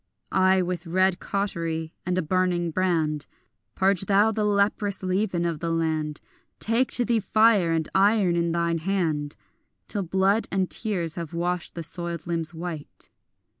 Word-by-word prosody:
Ay, 190 0 +3
with 180 -1 -4
red 185 +1 +2
cautery 165 -5 -3
and 180 0 0
a 185 - +1
burning 175 0 0
brand 160 -4 0 0.5
Purge 195 0 +2
thou 205 +2 +4
the 215 -1 -1
leprous 200 -1 +1
leaven 185 -2 0
of 165 -3 -2
the 165 - -2
land; 160 -2 -1 0.4
Take 230 +4 +1
to 245 - +3
thee 235 -1 +2
fire, 215 -4 +3
and 160 -1 0
iron 195 -2 +3
in 170 0 +1
thine 170 0 0
hand, 160 -5 -1 0.5
Till 205 - -2
blood 190 +4 +1
and 190 -1 0
tears 180 -8 -1
have 165 0 -7
washed 175 +1 -2
the 170 - -4
soiled 170 0 -1
limbs 165 -1 -2
white. 165 -3 -7
180 Hz, 155 wpm, -25 LUFS, 165-195 Hz, 0.5 s, thou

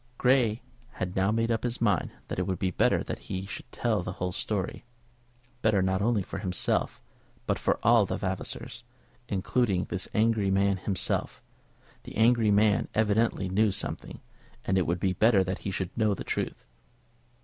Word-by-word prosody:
Grey 125 -3 +3 0.3
had 90 0 -4
now 95 +1 +2
made 115 +2 +1
up 115 - 0
his 120 0 -2
mind 105 -6 +1 0.2
that - - -4
it 90 - -1
would 95 -1 -1
be 95 +1 -1
better - - +2
that - - -5
he 95 +1 -3
should 100 - -9
tell 110 -5 0
the - - -5
whole 90 0 -3
story, 95 +1 -3 0.8
better 110 -3 +3
not 95 +1 +1
only 110 -2 +2
for 100 - -6
himself, 90 -3 -1 0.5
but - - 0
for - - +1
all 115 -3 +5
the - - -2
Vavasors, 95 -1 -4 0.5
including 100 -1 +1
this 90 0 -4
angry 110 -2 +2
man 100 0 +2
himself. 95 -1 -1 0.6
The - - -11
angry 115 0 +4
man 105 0 +3
evidently 110 -2 +2
knew 100 +3 +2
something, 95 - -5 0.4
and 95 - +1
it 95 -2 +2
would 85 +1 0
be 95 0 +1
better 105 0 +4
that 95 0 -3
he - - -4
should 95 -1 -4
know 110 -3 +2
the - - -6
truth. - - -3
100 Hz, 175 wpm, -28 LUFS, 95-110 Hz, 0.8 s, all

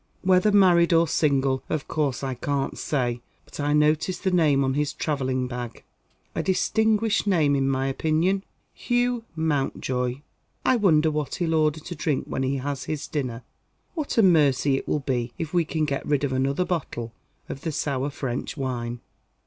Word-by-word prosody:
Whether 185 +2 +4
married 180 -4 +5
or 165 0 +4
single, 135 -4 +1
of 155 -4 -2
course 140 -4 -1
I 135 -1 -2
can't 140 +2 -2
say. 120 -4 -1 0.2
But - - -12
I 145 0 0
noticed 155 +5 +2
the 190 - +1
name 150 -6 +3
on 130 0 0
his 145 +1 -1
travelling 130 -4 -1
bag. 125 -2 -6 0.5
A - - -1
distinguished 220 +3 +1
name 155 -7 +3
in 135 -1 +1
my 135 0 0
opinion 160 +8 +1 0.3
Hugh 245 -1 0
Mountjoy. 135 -4 -1 0.4
I 255 - +4
wonder 160 -7 +3
what 150 -2 -2
he'll 165 -2 -1
order 155 -1 +2
to 175 - -7
drink 150 -2 -1
when - - -3
he 135 +1 0
has 135 0 -3
his 155 -2 -3
dinner? 125 -5 -3 0.5
What 310 -7 -3
a 225 - +6
mercy 145 -6 +4
it - - -6
will 150 - 0
be 120 -3 -2
if 160 -1 -5
we 175 -2 +3
can 155 0 -1
get 140 -2 -2
rid 145 -1 0
of 135 -2 0
another 135 +6 +1
bottle 120 -10 -3 0.3
of 135 - -7
the 160 - -2
sour 140 -2 -1
French 135 0 -4
wine!" 120 -3 -3
145 Hz, 175 wpm, -25 LUFS, 135-170 Hz, 0.5 s, a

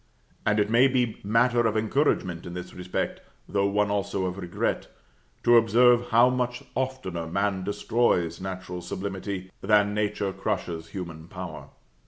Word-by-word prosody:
And 105 0 +3
it 105 - +3
may 120 +4 +6
be 125 -4 0
matter 120 +3 +3
of 110 0 0
encouragement 105 - 0
in 85 - -7
this 90 0 -7
respect, 90 0 -3 0.3
though 100 -1 +1
one 100 0 +1
also 100 -1 -1
of 90 +1 -3
regret, 90 -2 -2 0.6
to 120 0 +7
observe 120 +1 +5
how 120 +2 +6
much 125 -1 -2
oftener 130 -11 -3
man 100 +2 0
destroys 100 -4 +1
natural 95 -1 -5
sublimity, 95 0 -5
than 105 0 +3
nature 105 -2 -1
crushes 80 -3 -3
human 85 -3 -7
power. 90 -3 -8
100 Hz, 145 wpm, -26 LUFS, 90-115 Hz, 0.6 s, to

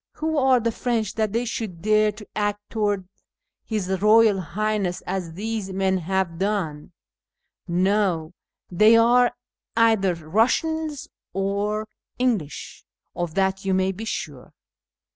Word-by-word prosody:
Wlio 315 -1 0
are 260 -2 +4
the 230 0 0
French 225 -3 -1
that 215 -2 -1
they 230 +3 0
shoiikl 220 -7 -4
dare 215 0 +3
to 210 0 -12
act 205 0 -2
towanls 205 -4 0 0.6
liis 215 -5 -1
IJoyal 215 +2 +5
]liu; 190 -3 -4
hness 210 -4 -1
as 180 -3 -3
these 210 +1 -4
men 190 0 +1
liave 180 -1 -1
done? 185 -7 -2 0.8
No; 180 -2 +1 0.4
they 215 +5 +6
arc 245 +2 +4 0.4
cither 220 -5 +3
Kussians 270 - 0 0.3
or 200 +3 -1 0.3
English; 225 - -2 0.3
of 175 -2 -3
that 190 0 +1
you 190 -1 +1
may 190 +1 +1
he 220 +4 -6
sure." 145 - -6
205 Hz, 130 wpm, -24 LUFS, 185-225 Hz, 0.8 s, they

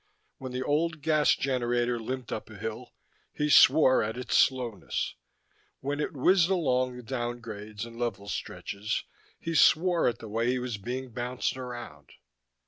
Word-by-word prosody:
When 130 -1 -6
the 125 +1 -2
old 155 +1 0
gas 155 -2 +4
generator 120 -2 0
limped 130 +2 -5
up - - -5
a 110 - -11
hill, 110 +4 -6 0.4
he 150 0 -1
swore 135 -2 +7
at 110 +3 -3
its 125 - -2
slowness; 120 - +1 0.7
when 145 +2 -3
it 150 - -1
whizzed 170 +5 +4
along 130 -9 +1
the 125 - -9
downgrades 115 -4 -5
and 115 0 -11
level 110 -4 -3
stretches, 105 +1 -4 0.4
he 165 - -4
swore 170 +2 +4
at 120 - 0
the 115 - -9
way 115 +3 -1
he 130 - +1
was 125 -4 -4
being 125 +4 -5
bounced 125 +3 -2
around. 120 - -8
125 Hz, 155 wpm, -28 LUFS, 115-135 Hz, 0.7 s, swore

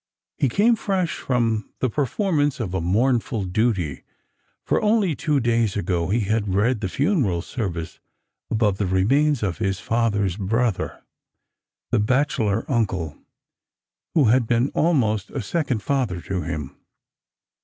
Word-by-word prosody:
He 135 - +2
came 225 - +3
fresh 190 -6 -1
from 115 -4 0
the 130 - +1
perform 150 - 0
ance 145 -2 +1
of 100 -6 -3
a 95 - -1
mournful 115 - +1
duty, 90 - 0 0.6
for - - +1
only 210 -5 +2
two 150 0 0
days 115 -4 +1
ago 85 -3 -1
he 115 +4 +2
had 105 -1 0
read 110 +3 +2
the 95 - -2
funeral 135 - +1
service 85 -9 -4 0.5
above 105 -3 +1
the 100 - 0
remain« 135 +12 +3
of 95 -2 -2
his 95 -3 -1
father's 105 -5 0
brother, 110 +1 -1 0.9
the 120 - +3
bachelor 115 -3 +1
uncle 95 - -1 1.0
who 155 - +5
had 120 +1 +3
been 120 +4 +2
almost 115 - +1
a 140 - -4
second 130 - -1
father 125 -11 0
to 95 0 -3
him. 75 -6 -5
115 Hz, 140 wpm, -23 LUFS, 95-135 Hz, 1.0 s, who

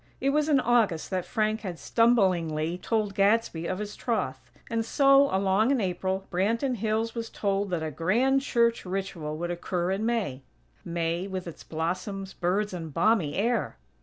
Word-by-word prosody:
It 275 - +1
was 300 +1 +1
in 285 -3 +5
August 230 -11 +1
that 185 -2 -2
Frank 215 -1 0
had 185 -5 -5
stumblingly 180 -9 +2
told 215 -1 -1
Gadsby 200 -4 +2
of 185 - -2
his 210 0 -5
troth; 130 - -3 0.2
and 230 -1 -1
so, 275 +3 +5
along 195 +4 +2
in 275 -2 +2
April, 190 0 -2
Branton 230 +8 0
Hills 220 +2 -1
was 230 -1 -4
told 200 -1 -1
that 175 -3 -2
a 155 - -3
grand 235 - +2
church 235 -3 +1
ritual 180 -5 -4
would 175 +2 -3
occur 175 +1 -2
in 195 +3 -1
May. 220 - -1 0.4
May, 170 +2 -2
with 185 -2 -5
its 170 - -9
blossoms, 185 +4 -4
birds 195 +4 -1
and 165 -3 -5
balmy 170 -1 +2
air! 225 - 0
195 Hz, 165 wpm, -27 LUFS, 175-230 Hz, 0.4 s, in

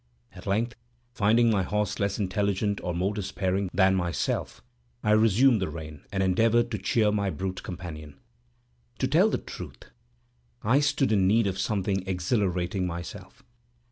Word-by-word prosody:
At - - -11
length, 115 +5 0 0.4
finding 115 +2 +3
my 100 -3 +2
horse 105 +2 -1
less 100 0 0
intelligent 100 +1 -1
or 90 - -2
more 95 +4 0
despairing 95 -1 -2
than 95 0 +4
myself, 85 -8 -2 0.4
I 105 - +2
resumed 110 +2 +4
the 95 - -1
rein, 75 -2 -9
and 95 -1 0
endeavored 115 +5 +2
to 110 - -2
cheer 105 +2 +2
my 100 -1 0
brute 95 +2 -4
companion. 80 -5 -8 0.8
To - - 0
tell - - +4
the - - 0
truth, - - -10 0.7
I 125 +6 +4
stood 145 -3 +1
in 95 -3 +3
need 110 +3 +3
of 95 -1 -2
something 100 -2 0
exhilarating 90 -1 0
myself. 85 -1 -8
100 Hz, 150 wpm, -27 LUFS, 90-105 Hz, 0.8 s, than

